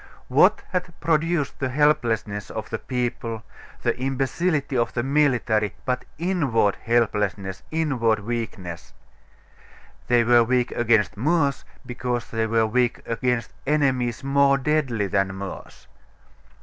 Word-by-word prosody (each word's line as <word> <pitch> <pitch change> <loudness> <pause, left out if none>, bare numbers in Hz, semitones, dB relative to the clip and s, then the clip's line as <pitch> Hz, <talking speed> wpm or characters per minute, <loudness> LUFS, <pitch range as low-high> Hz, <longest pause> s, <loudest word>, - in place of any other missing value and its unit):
What - - +4
had 180 -2 -3
produced 160 -1 0
the 130 - -1
helplessness 115 -8 +1
of - - -6
the - - -2
people, 120 -3 -3 0.4
the - - +1
imbecility 135 +3 -1
of 120 -1 +1
the 120 - 0
military, 125 -7 +1
but 125 -1 -1
inward 145 - +1
helplessness, 105 -5 0
inward 130 -9 +1
weakness? 100 -6 -5 1.1
They 120 -1 +4
were 120 0 +5
weak 125 +1 +1
against 110 -4 +2
Moors, 145 +2 +1 0.2
because 125 -1 -3
they 115 0 0
were 110 0 +2
weak 120 +2 0
against 115 0 -1
enemies 130 -6 +1
more 140 0 +4
deadly 135 -6 0
than 95 0 0
Moors. 100 0 -8
120 Hz, 120 wpm, -24 LUFS, 110-140 Hz, 1.1 s, were